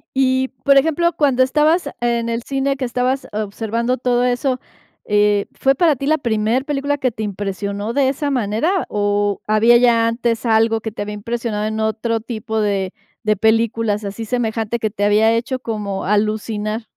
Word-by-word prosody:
Y, 260 0 +2
por 275 -1 +5
ejemplo, 320 +4 +2
cuando 275 -4 +2
estabas 300 +4 +2
en 235 -1 0
el 230 0 -2
cine, 275 +1 -1
que 260 - -2
estabas 250 +2 -1
observando 225 +4 -2
todo 245 0 +1
eso, 250 +1 0 0.5
eh, 205 -1 +2
¿fue 270 - +2
para 310 +1 +3
ti 275 - -5
la 310 +2 +2
primer 230 +1 0
película 285 0 -1
que 260 - +1
te 220 -1 -6
impresionó 200 +1 -3
de 270 0 +2
esa 285 +2 -2
manera? 260 - 0
¿O 205 -1 0
había 220 +3 +5
ya 235 -1 +4
antes 230 0 -1
algo 225 0 +3
que 220 - -4
te 210 - -7
había 210 0 -4
impresionado 220 0 -3
en 220 0 -2
otro 220 +1 -1
tipo 220 -1 -4
de 195 -2 -1 0.3
de 215 -1 +1
películas 220 -1 +1
así 205 +3 -5
semejante 225 -1 -1
que 220 - -1
te 205 -1 -4
había 215 +2 +4
hecho 245 +3 -1
como 210 -5 -4
alucinar? 215 +1 -1
230 Hz, 175 wpm, -19 LUFS, 215-260 Hz, 0.5 s, por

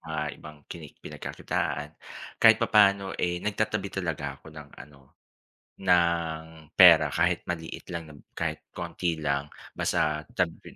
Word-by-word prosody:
mga 80 -1 -4 0.2
ibang 75 -1 -11
kini 80 -4 -9 0.2
pinagkakitaan. 75 +2 -4 0.5
Kahit - - +8
papano, 100 -2 +3
eh, 90 0 -1
nagtatabi 105 -1 -1
talaga 75 -7 -4
ako - - -20
ng 75 -2 -11
ano, 70 -2 -16 0.6
ng 85 -3 +2 0.3
pera 85 -4 +9
kahit 65 - +1
maliit 80 -2 -5
lang 85 -1 -4
na - - -14 0.2
kahit - - -4
konti 85 -2 -2
lang, 70 -1 -1 0.3
basta 75 0 0
tabi - - -3
80 Hz, 130 wpm, -27 LUFS, 75-90 Hz, 0.6 s, pera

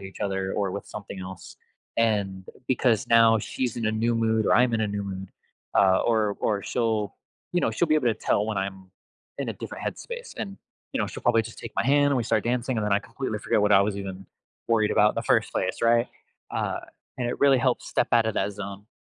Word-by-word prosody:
each 95 0 -10
other 95 -1 -1
or 100 -2 0
with 100 - -6
something 100 -2 -8
else." 95 -1 -9 0.4
And 100 -4 +1 0.2
because 120 -3 +2
now 115 -1 +6
she's 120 +3 -3
in 115 -2 -1
a 110 - +1
new 115 +2 +1
mood 110 -2 +1
or - - +4
I'm 120 0 +4
in 110 - 0
a 105 - +1
new 100 0 -3
mood, 95 -1 -6 0.5
uh 95 -1 +5
or 110 -3 +1
or 100 -2 0
she'll 110 -4 -1 0.4
you 175 - +2
know, - - +1
she'll 175 - +1
be 155 - +4
able 130 -6 +2
to 110 - +2
tell 105 - +1
when 105 -3 -1
I'm 95 -1 -5 0.5
in - - -3
a - - -1
different - - -7
headspace, 485 0 -6
and, 195 -1 -5 0.4
you - - -1
know, - - +1
she'll - - -8
probably 115 - +4
just 115 0 -10
take - - -8
my - - +1
hand, 145 +1 +4
and 140 - +2
we 120 - +1
start 110 -2 +1
dancing, 125 +1 0
and 105 - -1
then 105 - 0
I 100 - +4
completely 115 -2 -4
forget 105 - +1
what 105 - +3
I 100 - +7
was 100 0 0
even 95 -1 -6 0.4
worried 110 -2 +3
about 105 +1 +5
in - - -10
the - - 0
first - - +2
place, 95 0 -1
right? 115 +1 +4 0.4
Uh, - - -2 0.4
and 120 -1 -1
it - - -3
really 140 -2 +5
helps 130 -1 0
step - - +1
out 115 -1 +5
of 110 - -1
that 105 - 0
zone. 100 0 -7
110 Hz, 240 wpm, -26 LUFS, 100-120 Hz, 0.5 s, I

